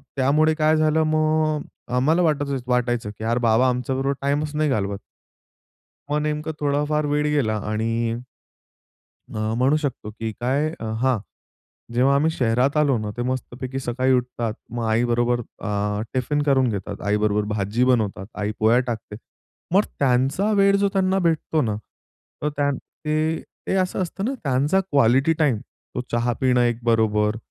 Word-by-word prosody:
त्यामुळे 150 Hz, +4 st, +3 dB
काय 155 Hz, 0 st, +3 dB
झालं 155 Hz, 0 st, +3 dB
मग 155 Hz, -1 st, +1 dB, 0.3 s
अ, 125 Hz, -, -1 dB
आम्हाला 155 Hz, +8 st, +3 dB
वाटत 145 Hz, -4 st, +1 dB, 0.2 s
वाटायचं 120 Hz, -3 st, 0 dB
की -, -, -6 dB
अरे 115 Hz, +2 st, +1 dB
बाबा, 120 Hz, +2 st, +3 dB
आमच्याबरोबर 130 Hz, +2 st, -1 dB
टाइमच 145 Hz, +2 st, -1 dB
नाही 155 Hz, 0 st, +1 dB
घालवत. 100 Hz, -5 st, -1 dB, 1.1 s
मग 150 Hz, +1 st, +1 dB
नेमकं 150 Hz, +1 st, -2 dB
थोडा 145 Hz, 0 st, +1 dB
फार 150 Hz, 0 st, +1 dB
वेळ 145 Hz, 0 st, +1 dB
गेला 135 Hz, -8 st, +1 dB
आणि 115 Hz, +1 st, -1 dB, 1.1 s
अ, 110 Hz, +1 st, -2 dB
म्हणू 135 Hz, +4 st, +3 dB
शकतो 140 Hz, -8 st, -3 dB
की 110 Hz, +1 st, -5 dB
काय 135 Hz, +5 st, +1 dB
अ, -, -, -5 dB, 0.2 s
हां. 130 Hz, -2 st, +2 dB, 0.8 s
जेव्हा 130 Hz, +3 st, +4 dB
आम्ही 150 Hz, +3 st, +3 dB
शहरात 125 Hz, 0 st, +1 dB
आलो 145 Hz, -4 st, +3 dB
ना 105 Hz, -1 st, -4 dB
ते 120 Hz, -, -2 dB
मस्तपैकी 130 Hz, 0 st, -4 dB
सकाळी 130 Hz, +1 st, 0 dB
उठतात, 120 Hz, -3 st, -1 dB, 0.2 s
मग 120 Hz, 0 st, -3 dB
आईबरोबर 120 Hz, +2 st, +2 dB
अ, 105 Hz, -2 st, -3 dB
टिफिन 145 Hz, +4 st, 0 dB
करून 135 Hz, -3 st, +3 dB
घेतात, 100 Hz, -2 st, -5 dB
आईबरोबर 105 Hz, 0 st, +1 dB
भाजी 105 Hz, +4 st, 0 dB
बनवतात, 110 Hz, -6 st, +1 dB
आई 105 Hz, +1 st, -2 dB
पोळ्या 110 Hz, +3 st, +4 dB
टाकते. 110 Hz, -3 st, -5 dB, 0.6 s
मग 200 Hz, -, +6 dB, 0.2 s
त्यांचा 135 Hz, +10 st, +2 dB
वेळ 200 Hz, -1 st, +4 dB
जो 200 Hz, 0 st, +2 dB
त्यांना 190 Hz, 0 st, +2 dB
भेटतो 160 Hz, -1 st, 0 dB
ना, 110 Hz, -3 st, -1 dB, 0.7 s
तर 150 Hz, -, +1 dB
त्या 145 Hz, -1 st, +2 dB, 0.3 s
ते 155 Hz, +1 st, 0 dB, 0.3 s
ते -, -, 0 dB
असं 185 Hz, 0 st, 0 dB
असतं 185 Hz, +2 st, -4 dB
ना 260 Hz, +5 st, -1 dB
त्यांचा 140 Hz, +7 st, +2 dB
क्वालिटी 140 Hz, -4 st, +3 dB
टाईम, 145 Hz, -7 st, +3 dB
तो 125 Hz, -, -9 dB
चहा 120 Hz, +1 st, +1 dB
पिणं 125 Hz, -2 st, +3 dB
एक 120 Hz, -1 st, +1 dB
बरोबर, 110 Hz, -2 st, +2 dB
130 Hz, 155 wpm, -23 LUFS, 115-150 Hz, 1.1 s, मग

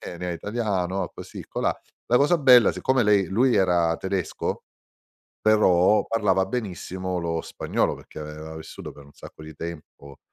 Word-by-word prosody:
"Eh, 85 Hz, -, -8 dB
lei 90 Hz, 0 st, -4 dB
è -, -, -2 dB
italiano" 100 Hz, -2 st, -2 dB
così -, -, -9 dB
colà. -, -, -1 dB, 0.3 s
La 125 Hz, -, +5 dB
cosa 150 Hz, +6 st, +3 dB
bella, 125 Hz, -6 st, +6 dB
siccome 130 Hz, -1 st, +1 dB
lei 105 Hz, -3 st, +3 dB
lui 120 Hz, +6 st, +2 dB
era 90 Hz, -4 st, +2 dB
tedesco, 95 Hz, -2 st, -3 dB, 0.8 s
però 105 Hz, -2 st, +4 dB
parlava 95 Hz, -4 st, +1 dB
benissimo 95 Hz, -4 st, -4 dB
lo 85 Hz, -1 st, -2 dB
spagnolo, -, -, -1 dB
perché -, -, -12 dB
aveva 75 Hz, +1 st, -8 dB
vissuto 80 Hz, -, -9 dB
per 70 Hz, -, -14 dB
un 70 Hz, -, -18 dB
sacco 80 Hz, -, -13 dB
di 80 Hz, 0 st, -10 dB
tempo, 75 Hz, -4 st, -9 dB
95 Hz, 155 wpm, -24 LUFS, 85-110 Hz, 0.8 s, bella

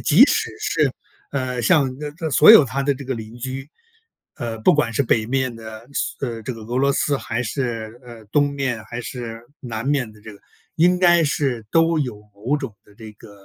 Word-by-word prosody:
即 -, -, +7 dB
使 -, -, 0 dB
是， -, -, +1 dB, 0.4 s
呃， 130 Hz, -3 st, -2 dB
像 145 Hz, -3 st, +3 dB, 0.3 s
它 160 Hz, -3 st, -3 dB
所 150 Hz, -, +8 dB
有 145 Hz, -, +10 dB
它 135 Hz, +3 st, -2 dB
的 140 Hz, 0 st, +1 dB
这 140 Hz, +1 st, -9 dB
个 135 Hz, -, -2 dB
邻 110 Hz, +1 st, -8 dB
居， 130 Hz, +3 st, -6 dB, 0.7 s
呃， 115 Hz, -2 st, -4 dB
不 110 Hz, -, +5 dB
管 145 Hz, -6 st, +1 dB
是 140 Hz, -, +2 dB
北 110 Hz, -3 st, +1 dB
面 130 Hz, 0 st, -1 dB
的 110 Hz, 0 st, -10 dB
斯 -, -, -2 dB
呃， 115 Hz, -2 st, -5 dB
这 125 Hz, +2 st, -5 dB
个 110 Hz, -, -10 dB
俄 120 Hz, +4 st, -3 dB
罗 140 Hz, +1 st, +3 dB
斯 140 Hz, -1 st, 0 dB
还 120 Hz, +2 st, -3 dB
是， 115 Hz, -2 st, -4 dB
呃， 115 Hz, -3 st, -12 dB
东 145 Hz, -1 st, +3 dB
面， 130 Hz, -5 st, -2 dB
还 120 Hz, -, -7 dB
是 115 Hz, -2 st, -7 dB, 0.2 s
南 115 Hz, -1 st, -5 dB
面 135 Hz, -6 st, 0 dB
的 105 Hz, -1 st, -19 dB
这 110 Hz, -1 st, -10 dB
个， 100 Hz, -, -16 dB, 0.4 s
应 180 Hz, +2 st, +4 dB
该 175 Hz, -2 st, +5 dB
是 135 Hz, -7 st, -1 dB
都 165 Hz, 0 st, +3 dB
有 125 Hz, -7 st, -3 dB, 0.2 s
某 120 Hz, +9 st, -1 dB
种 135 Hz, -8 st, -6 dB
的 105 Hz, -, -21 dB
这 110 Hz, 0 st, -11 dB
个 105 Hz, -, -16 dB
信 100 Hz, -, -20 dB
125 Hz, 230 characters per minute, -21 LUFS, 115-140 Hz, 0.7 s, 有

